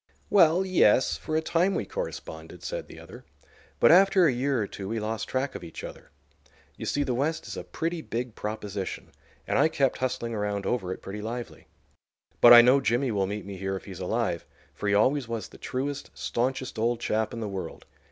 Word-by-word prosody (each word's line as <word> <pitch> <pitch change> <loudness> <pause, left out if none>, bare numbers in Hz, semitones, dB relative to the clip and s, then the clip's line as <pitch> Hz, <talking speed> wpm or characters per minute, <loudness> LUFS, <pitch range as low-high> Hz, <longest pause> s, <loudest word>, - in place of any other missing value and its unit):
"Well, 180 -1 +5
yes, 135 - +4
for 155 - -4
a 160 - 0
time 175 +4 +1
we - - -1
corresponded," - - -7
said - - -4
the - - -12
other. - - -12 0.6
"But - - +6
after 190 0 +6
a 150 - +4
year 130 +1 0
or 105 - 0
two 100 -1 -7
we 115 0 -2
lost 110 +1 -3
track 130 +1 -1
of - - -7
each 85 - -9
other. - - -9 0.7
You - - -6
see, 145 - +1
the 125 - -1
West 150 +6 -1
is - - -6
a - - -5
pretty 165 0 -3
big 120 -3 -4
proposition, 105 -3 -5 0.4
and - - +1
I - - +6
kept 135 -4 0
hustling 120 -2 -2
around 105 -2 -2
over 95 -7 -1
it - - -7
pretty 100 +2 -6
lively. 120 +2 -6 0.7
But 120 - +9
I 120 0 +11
know 130 +3 +5
Jimmy 125 +1 +1
will 100 -2 0
meet 105 +1 -5
me 100 -1 -7
here 95 +1 -3
if 95 - -7
he's 95 -3 -9
alive, 95 -2 -1 0.3
for 105 - -3
he 100 - +3
always 130 +5 +2
was 115 -2 -4
the - - -15
truest, 140 +2 -4
stanchest 130 0 -2
old 115 +1 +1
chap 110 -2 -1
in 115 - -6
the 110 - -3
world. 95 -4 -6
120 Hz, 210 wpm, -27 LUFS, 105-140 Hz, 0.7 s, I